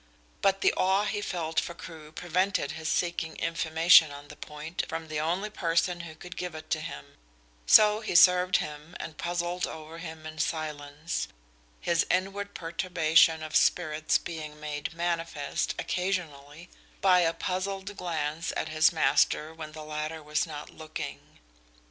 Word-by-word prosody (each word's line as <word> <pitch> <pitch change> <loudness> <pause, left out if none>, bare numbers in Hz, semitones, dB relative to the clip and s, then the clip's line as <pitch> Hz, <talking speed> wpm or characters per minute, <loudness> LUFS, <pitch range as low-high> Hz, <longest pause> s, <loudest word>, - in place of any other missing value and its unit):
But 195 0 +2
the - - +4
awe 190 +2 +3
he 205 0 -2
felt 165 -5 -1
for 170 - -4
Crewe 155 -2 -10
prevented 180 -1 0
his 160 0 -5
seeking 170 -2 -1
information 165 0 +5
on 145 0 -10
the - - -10
point 150 +3 -5
from 165 -1 -5
the 155 -1 -2
only 180 +7 -1
person 175 -1 0
who 165 -2 -8
could 180 +3 -10
give 180 -2 -5
it 155 0 -10
to 155 - +1
him, 70 - -8 0.5
so 210 0 +7
he 215 -5 -4
served 180 +1 +7
him 150 +3 -6
and 155 - -7
puzzled 175 +1 -1
over 160 +1 -9
him 160 -2 -8
in 155 0 -8
silence, 150 0 -3 0.5
his 170 -1 +1
inward 195 +2 -1
perturbation 165 -2 +3
of 155 0 -6
spirits 155 -3 +3
being 155 -2 -7
made 150 -1 -4
manifest 170 -4 -2
occasionally 170 -4 -3 0.3
by 185 -2 +5
a 165 -2 +3
puzzled 190 +3 -3
glance 165 -3 -2
at - - -2
his 155 0 +4
master 155 0 +2
when 155 -1 -8
the 155 0 -8
latter 155 +1 -4
was 150 +3 0
not 150 -1 -8
looking. 155 0 -7
165 Hz, 155 wpm, -28 LUFS, 155-180 Hz, 0.5 s, so